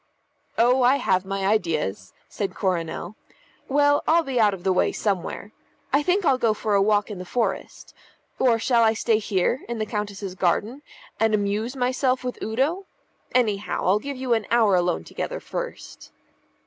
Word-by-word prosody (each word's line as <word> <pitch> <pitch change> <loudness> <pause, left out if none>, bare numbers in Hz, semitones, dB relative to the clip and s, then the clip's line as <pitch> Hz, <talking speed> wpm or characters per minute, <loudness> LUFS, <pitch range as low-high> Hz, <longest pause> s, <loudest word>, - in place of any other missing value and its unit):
"Oh, 250 +3 +4
I 250 +2 +5
have 185 -8 +1
my 195 0 -3
ideas," 155 - -1 0.2
said 200 -2 -4
Coronel. 175 +1 -2 0.5
"Well, 290 +1 +3
I'll 335 +1 +4
be 265 -5 -2
out 210 -2 +5
of 175 - -14
the 190 - +2
way 180 - +2
somewhere. 200 0 -3 0.4
I 285 - +4
think 365 +5 +1
I'll 265 -3 +3
go 225 -3 +2
for 215 0 -2
a 200 - +4
walk 210 +1 +2
in 200 - -6
the - - -5
forest. 205 +1 -3 0.5
Or 245 -3 +4
shall 235 +1 +2
I 225 -1 +4
stay 225 0 +1
here, 205 +3 0
in 235 - -3
the 215 - -1
Countess's 205 -3 -4
garden, 205 +9 -1 0.4
and 220 -1 +3
amuse 210 +5 -1
myself 255 0 0
with 250 -1 -5
Udo? 285 - -1 0.5
Anyhow, 215 -5 0
I'll 195 +3 +3
give 280 +4 -6
you 255 -2 0
an 225 -2 -1
hour 225 -4 +4
alone 175 -1 +1
together - - -5
first." - - -7
220 Hz, 175 wpm, -24 LUFS, 195-255 Hz, 0.5 s, I